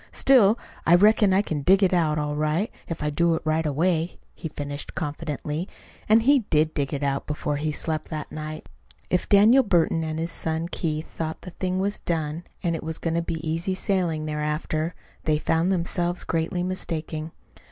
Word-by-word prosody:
"Still, 235 -5 +5 0.3
I 170 - +6
reckon 210 +1 +5
I 195 +2 +4
can 155 -7 -3
dig 190 +7 +4
it 185 - +3
out 160 -4 +2
all 150 0 -1
right 155 +7 0 0.2
if 165 -2 -4
I 150 - 0
do 170 +2 +2
it - - -4
right 155 0 +1
away," 165 +3 0 0.2
he 165 - -6
finished 145 0 -6
confidently. 150 +2 -3 0.4
And 220 +1 +6
he 280 +3 +5
did 155 +1 +2
dig 140 -2 -1
it 145 0 -3
out 140 -1 -1
before 150 0 -2
he 155 +1 -1
slept 155 +1 -2
that 155 -2 -5
night. 155 0 -6 0.4
If 180 - 0
Daniel 215 +6 +7
Burton 170 -7 +2
and 155 0 -3
his 165 +1 -2
son 160 +1 -2
Keith 155 -3 -2
thought 160 -1 -5
the 180 - -9
thing 185 +1 -2
was 200 +2 -1
done, 160 0 -2 0.2
and 170 -2 +1
it - - -4
was 160 0 -4
going 165 - -2
to 170 - +1
be 165 -1 -4
easy 165 +4 -1
sailing 175 -5 0
thereafter, 155 +2 -2 0.3
they 155 -1 +3
found 165 +4 +1
themselves 175 0 -1
greatly 165 +2 -1
mistaken. 165 -3 -4
165 Hz, 190 wpm, -25 LUFS, 155-180 Hz, 0.4 s, Daniel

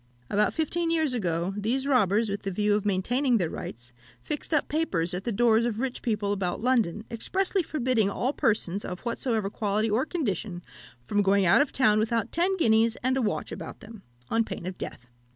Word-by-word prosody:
"About 210 +1 +3
fifteen 330 +1 0
years 315 -5 +1
ago, 175 -4 -1
these 235 +6 -1
robbers, 225 -5 +3
with 200 0 -3
the 195 - -3
view 210 +2 +1
of 210 0 0
maintaining 240 +7 +2
their 175 -6 -1
rights, 120 +1 -8 0.3
fixed 295 - -5
up 305 -3 +2
papers 190 - -1
at 180 +2 -4
the 240 - 0
doors 230 +1 +3
of 230 -2 -1
rich 260 0 -3
people 210 -3 -1
about 190 -3 -1
London, 225 -5 +1
expressly 380 - 0
forbidding 255 - +1
all 250 +7 -1
persons, 205 -5 0
of 180 0 -6
whatsoever 230 -4 -1
quality 215 +1 0
or 245 +8 +1
condition, 205 - -3 0.4
from 205 +11 +1
going 200 0 +3
out 175 +10 +6
of 285 - 0
town 215 -5 +3
without 225 0 0
ten 370 +3 +1
guineas 225 -6 +3
and 260 +1 +2
a 265 - +1
watch 210 -4 -2
about - - -8
them, 220 -2 -11 0.3
on 230 0 +3
pain 175 - -7
of 185 0 -4
death. 125 - -7
220 Hz, 195 wpm, -27 LUFS, 200-255 Hz, 0.4 s, out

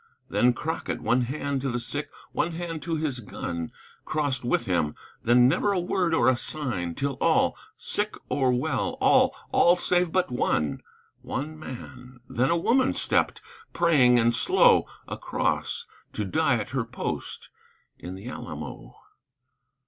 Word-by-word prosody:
Then 125 0 +3
Crockett, 160 +7 -3
one 125 +1 +2
hand 140 +2 -2
to 135 - -1
the 120 0 -1
sick, 145 +5 -2 0.2
one 170 - -1
hand 165 -1 -5
to 165 -1 -2
his 150 -5 -1
gun, 85 -6 -5 0.3
Crossed 145 -4 -1
with 120 0 +1
him; 85 -6 0 0.3
then 120 +1 +5
never 205 +10 +2
a 190 - +1
word 175 -1 0
or 120 - +3
a 130 - +5
sign 120 - -2
Till 140 -2 -2
all, - - +3 0.2
sick 210 +1 -1
or 130 -2 +1
well, 125 0 -1
all, - - +4 0.2
all 175 +1 +5
save 180 -1 +1
but 185 -5 +1
one, 80 - 0 0.4
One 155 +3 -5
man. 125 -2 -10
Then 130 +3 +1
a 170 - +3
woman 255 +9 +2
stepped, - - +1 0.3
praying, 140 -8 +4
and 120 0 +3
slow - - +4 0.2
Across; - - -2 0.3
to 105 - -2
die 95 - +2
at - - -3
her - - -1
post - - -5 0.5
in 90 +1 -7
the 100 +5 -9
Alamo. - - -7
130 Hz, 150 wpm, -26 LUFS, 120-165 Hz, 0.5 s, then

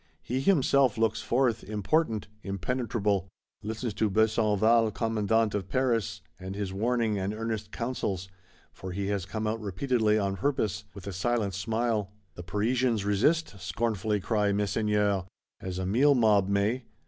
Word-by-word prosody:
He 125 +2 -2
himself 140 - +3
looks 110 -1 +1
forth, 120 0 +1
important, 110 - 0
impenetrable; 100 -1 -1 0.3
listens 110 +1 -4
to 105 +2 +1
Besenval 110 +1 +3
Commandant 110 0 +1
of 95 -2 -3
Paris, 115 -6 0 0.2
and 95 +1 -6
his 100 -2 -3
warning 110 0 0
and 95 +3 -2
earnest 110 -1 -4
counsels 105 -7 -3 0.5
(for 95 -1 -7
he 100 +1 -2
has 100 -3 -2
come 110 +3 -3
out 110 +1 -1
repeatedly 110 +1 +1
on 100 -2 -1
purpose), 105 -4 -1
with 100 - -10
a 100 - -5
silent 105 +1 0
smile. 110 +1 -1 0.2
The 90 - -8
Parisians 110 +4 0
resist? 105 +4 +1
scornfully 105 +3 -1
cry 105 +1 +1
Messeigneurs. 105 -1 +1 0.4
As 95 -1 -5
a 95 - -2
meal 135 +9 +4
mob 105 -5 +4
may! 105 +5 +1
105 Hz, 145 wpm, -28 LUFS, 100-115 Hz, 0.5 s, meal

